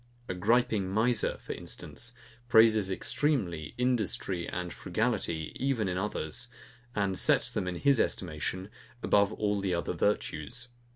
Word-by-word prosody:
A - - -2
griping 105 0 +2
miser, 110 +3 +1
for - - -6
instance, 120 0 -5 0.4
praises 110 -4 +6
extremely 95 - 0
INDUSTRY 110 -7 0
and 90 -1 -4
FRUGALITY 95 -5 -1
even 130 -7 +1
in 90 0 -1
others, 95 -6 -2 0.5
and 100 -2 0
sets - - +3
them, 90 - -2
in 90 - -2
his 140 +6 +3
estimation, 90 +3 -2 0.3
above 100 0 +4
all 105 -2 0
the 95 -2 0
other 85 - -2
virtues. 105 +5 -1
100 Hz, 130 wpm, -30 LUFS, 90-115 Hz, 0.5 s, praises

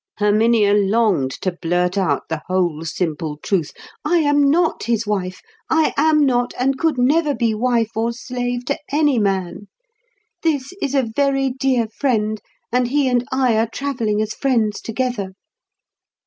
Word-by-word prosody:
Herminia 210 0 +3
longed 205 - +2
to 185 - +1
blurt 175 +1 -1
out 195 -2 0
the 160 -1 -4
whole 175 -4 0
simple 155 -2 -3
truth. 165 0 -1 0.3
"I 330 +4 +2
am 290 -3 +3
not 330 +2 +1
his 230 -1 0
wife. 185 -3 -3 0.3
I 320 -1 +2
am 305 0 +3
not, 245 -2 0
and 270 +2 +1
could 320 -5 +1
never 290 +4 +2
be 230 -2 +1
wife 230 0 0
or 225 +1 0
slave 245 +1 -4
to 280 - -2
any 290 -4 +2
man. 195 -1 -2 0.7
This 300 -1 -1
is 280 0 -1
a 270 - +3
very 270 -1 +1
dear 255 -3 0
friend, 215 -3 -1 0.3
and 250 0 +2
he 280 +2 +1
and 245 0 0
I 255 -3 +2
are 225 0 +1
travelling 230 -7 -1
as 215 - -4
friends 230 -6 0
together." 225 -5 -3
235 Hz, 155 wpm, -20 LUFS, 205-270 Hz, 0.7 s, Herminia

